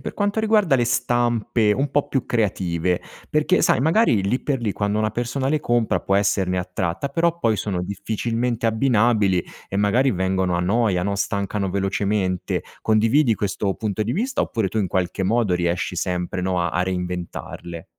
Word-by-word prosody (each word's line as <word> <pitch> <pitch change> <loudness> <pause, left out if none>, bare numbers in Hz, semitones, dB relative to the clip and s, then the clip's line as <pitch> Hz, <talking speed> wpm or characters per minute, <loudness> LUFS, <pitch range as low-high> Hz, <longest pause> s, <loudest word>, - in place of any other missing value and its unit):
per - - -6
quanto 205 +1 0
riguarda 215 -8 +3
le 120 - +3
stampe 120 -2 +1
un 135 +6 -1
po' 145 - +1
più 135 -4 -1
creative 90 -6 0 0.3
perché, 155 +5 +2
sai, - - +4
magari 160 - +3
lì 100 +7 0
per 135 -4 -1
lì, 110 -4 -1
quando 105 +1 -1
una 110 0 +1
persona 120 +3 -2
le 155 +1 +1
compra, 120 -3 +1
può 95 - +1
esserne 95 -2 +1
attratta. 90 +5 -2
Però 170 +4 0
poi 115 -9 +1
sono 95 -4 -2
difficilmente 115 +4 -2
abbinabili 110 -5 +2 0.2
e 95 - -4
magari 115 +7 +3
vengono 95 -2 0
a - - 0
noia, 95 -1 +1
no, 100 0 -1
stancano 100 0 -2
velocemente. 95 -1 -1 0.2
Condividi 115 +4 +3
questo 100 0 -1
punto 110 -1 -2
di 115 +3 -2
vista, 250 +7 -1
oppure 110 -3 0
tu, 110 - -3
in 100 -3 0
qualche 90 +1 -1
modo, 105 -1 +1
riesci 90 0 -1
sempre, 90 +1 -2
no, 90 -1 0
a 85 - -1
a 90 - +2
reinventarle? 90 -2 -5
105 Hz, 175 wpm, -22 LUFS, 95-120 Hz, 0.3 s, sai